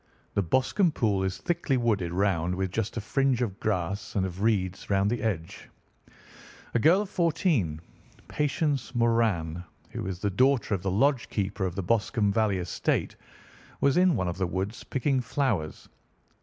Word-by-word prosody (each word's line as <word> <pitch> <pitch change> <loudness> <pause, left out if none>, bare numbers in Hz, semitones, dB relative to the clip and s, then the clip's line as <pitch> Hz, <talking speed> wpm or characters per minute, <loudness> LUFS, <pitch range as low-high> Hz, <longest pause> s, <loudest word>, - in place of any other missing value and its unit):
The - - +2
Boscombe 130 - +2
Pool 105 -8 +1
is 95 0 -2
thickly 165 -6 0
wooded 105 -8 0
round, 90 -2 +1
with 95 0 -2
just 110 +2 -2
a - - -1
fringe 130 +2 +1
of 100 -5 -4
grass 100 -1 -2
and 95 -2 +1
of 95 +1 -6
reeds 95 -4 0
round 100 +1 +2
the 120 -2 -1
edge. 90 -8 -3 1.0
A 120 - +2
girl 170 - +5
of 200 - -10
fourteen, 155 - +1 0.5
Patience 145 -3 -1
Moran, 110 -9 +1 0.3
who - - -4
is 95 -2 -3
the 100 +2 -1
daughter 130 0 +2
of 95 - -1
the 95 - -1
lodge 125 +7 +2
keeper 100 -1 -1
of 90 - -6
the 100 - -2
Boscombe 105 +1 +1
Valley 105 -2 +2
estate, 90 -2 -1 0.6
was 140 -1 +3
in 180 -1 +4
one 90 - -1
of 90 +1 -4
the 95 - +1
woods 95 +5 -3
picking 135 0 0
flowers. 115 - -2
105 Hz, 170 wpm, -27 LUFS, 95-130 Hz, 1.0 s, girl